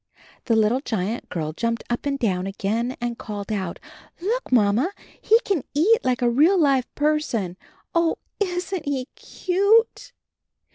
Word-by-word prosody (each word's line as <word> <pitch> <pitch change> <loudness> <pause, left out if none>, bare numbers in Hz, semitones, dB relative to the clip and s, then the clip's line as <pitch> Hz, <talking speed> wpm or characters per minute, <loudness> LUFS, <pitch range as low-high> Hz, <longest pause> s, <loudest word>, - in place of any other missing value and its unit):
The 230 - +2
little 220 +3 +3
giant 220 -3 -3
girl 155 -3 -3
jumped 230 +5 -2
up 240 +4 -2
and 280 -1 0
down 190 -7 0
again 220 +6 -2
and 240 -1 -3
called 205 0 -6
out: 190 -5 -2 0.4
"Look, 445 - -2
Mamma, 235 - +3 0.3
he 450 +2 +5
can 375 - -1
eat 410 +10 +4
like 250 -1 0
a - - +4
real 315 +10 +4
live 275 -5 +3
person. 290 - 0 0.4
Oh, 335 -1 +2 0.2
isn^t 360 -2 -2
he 270 -2 -2
cute?" 400 +5 +1
255 Hz, 145 wpm, -23 LUFS, 215-335 Hz, 0.4 s, he